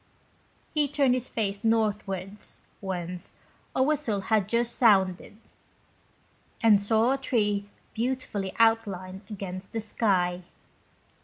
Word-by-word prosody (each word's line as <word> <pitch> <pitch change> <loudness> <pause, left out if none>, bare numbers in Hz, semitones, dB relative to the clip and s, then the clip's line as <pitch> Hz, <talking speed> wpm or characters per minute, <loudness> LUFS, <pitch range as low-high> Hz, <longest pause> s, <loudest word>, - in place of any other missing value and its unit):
He 300 -2 +2
turned 275 -2 +2
his 255 0 -2
face 200 -1 -2
northwards, 210 -3 -1 0.2
whence 180 -2 -4 0.4
a 260 - +4
whistle 265 -8 +1
had 205 0 +1
just 235 +1 +1
sounded, 195 -4 +3 1.2
and 215 -3 +5
saw 220 +4 +3
a 270 - 0
tree 205 -6 0 0.2
beautifully 230 -5 -2
outlined 200 -4 +1
against 190 -2 -6
the 225 - -1
sky. 185 -5 +1
210 Hz, 105 wpm, -27 LUFS, 190-230 Hz, 1.2 s, and